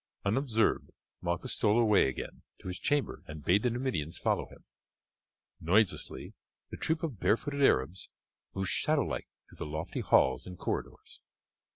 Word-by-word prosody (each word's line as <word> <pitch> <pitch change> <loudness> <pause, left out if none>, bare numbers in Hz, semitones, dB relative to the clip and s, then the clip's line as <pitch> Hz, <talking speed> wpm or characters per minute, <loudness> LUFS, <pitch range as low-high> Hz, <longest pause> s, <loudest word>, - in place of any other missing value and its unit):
Unobserved 115 +1 +2 0.3
Malchus 85 +9 -1
stole 110 +1 +3
away 105 - +5
again 65 - -5 0.2
to - - -10
his 90 0 -3
chamber 145 -1 0
and 75 -2 -9
bade 95 +4 +4
the 125 - +2
Numidians 115 - -2
follow - - 0
him. - - -16 1.0
Noiselessly 95 +5 +1 0.4
the - - -6
troop 160 +1 -1
of 140 - -3
barefooted 140 +5 +1
Arabs 85 - +2 0.5
moved 95 -2 -1
shadowlike - - 0 0.2
through - - -17
the 75 - -5
lofty 80 +2 -3
halls 65 +3 +3
and 90 0 -8
corridors. - - -5
100 Hz, 145 wpm, -31 LUFS, 85-125 Hz, 1.0 s, away